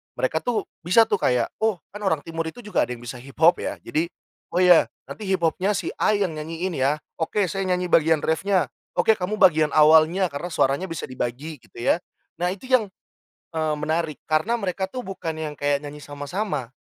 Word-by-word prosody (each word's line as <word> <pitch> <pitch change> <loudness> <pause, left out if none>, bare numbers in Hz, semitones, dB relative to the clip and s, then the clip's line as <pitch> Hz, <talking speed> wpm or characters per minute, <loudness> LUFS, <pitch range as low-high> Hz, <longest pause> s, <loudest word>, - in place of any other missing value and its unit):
mereka 145 +5 0
tuh 240 +3 -1 0.2
bisa 180 +7 +5
tuh 205 -3 0
kayak, 125 -1 +1
"Oh, 220 -2 +2 0.2
kan 205 - -8
orang 160 -8 0
timur 165 0 -4
itu 240 +9 -8
juga 210 - +1
ada 125 - -4
yang 120 - -13
bisa 125 +1 -7
hip-hop 155 +7 +3
ya." - - -3
Jadi, 160 +3 -1 0.5
"Oh, 180 - +3
ya 180 -2 +7 0.2
nanti 210 - -7
hip-hop-nya 190 +2 +1
si - - -2
A 215 - +3
yang 195 -4 0
nyanyiin 165 +4 -3
ya. 135 +3 +2 0.2
Oke 185 +5 0
saya 195 +2 -2
nyanyi 180 0 0
bagian 160 -1 +4
reff-nya. 185 +3 +1 0.3
Oke - - +4
kamu 190 +4 -1
bagian 160 -6 +4
awalnya, 160 +3 +5
karena 145 +5 -4
suaranya 160 +1 +1
bisa 165 -4 -5
dibagi 130 +5 -4
gitu - - -26
ya." 165 - +3 0.4
Nah 175 - +1
itu 195 - -14
yang, 245 -5 +4 0.6
eee, 155 -2 0
menarik. 155 +1 -1
Karena 155 +10 +1
mereka 190 -3 -2
tuh 250 +6 -6
bukan 180 -5 -5
yang 155 -1 -4
kayak 145 0 +1
nyanyi 145 +1 -8
sama-sama, 145 - -4
165 Hz, 190 wpm, -24 LUFS, 150-190 Hz, 0.6 s, ya